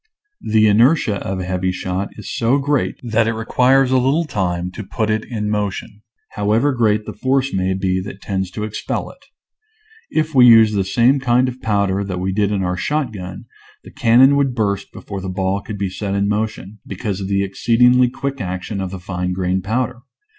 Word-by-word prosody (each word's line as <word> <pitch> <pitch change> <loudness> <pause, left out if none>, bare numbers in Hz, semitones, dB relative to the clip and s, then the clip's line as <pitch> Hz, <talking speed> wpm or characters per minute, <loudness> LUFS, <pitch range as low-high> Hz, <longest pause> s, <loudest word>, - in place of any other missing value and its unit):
The 110 0 +3
inertia 110 +1 +3
of 95 0 -3
a - - -3
heavy 95 0 -1
shot 95 +2 -3
is 105 - -7
so 120 +4 +2
great 145 -1 0
that 115 -1 +1
it 115 - 0
requires 130 +4 +2
a 130 - +4
little 140 +7 +1
time 90 - -2
to 105 - -7
put 110 +2 -2
it 110 0 0
in 105 -4 -4
motion, 105 0 -3 0.3
however 110 +7 +1
great 110 -3 +1
the - - -6
force 135 +4 0
may 95 0 0
be 95 -1 -1
that 95 +1 -8
tends 95 -2 -3
to 105 - -5
expel 105 0 -4
it. - - -22 0.9
If 155 0 -1
we 125 -2 +7
used 110 -2 +7
the 100 - +1
same 120 +8 +3
kind 125 0 +2
of 125 0 -6
powder 100 -2 0
that 95 -2 -4
we 95 +1 -2
did 105 0 +1
in 100 -2 -1
our 90 0 -2
shotgun 110 - -3 0.4
the - - -13
cannon 130 +4 +5
would 135 -3 +1
burst 100 -3 -1
before 100 -2 -7
the 95 - -5
ball 95 +1 -1
could 105 +1 -7
be 100 -2 -2
set 100 0 -3
in 100 0 +1
motion, 105 -1 -3
because 100 0 -4
of 95 - -4
the 100 0 +1
ex 100 - -11
ceedingly 125 +1 +4
quick 135 0 -4
action 95 +2 -4
of 95 - -3
the 95 0 -7
fine 90 0 -3
grain 95 0 -1
pow 110 +7 0
der. 125 -1 -11
105 Hz, 205 wpm, -19 LUFS, 95-125 Hz, 0.9 s, we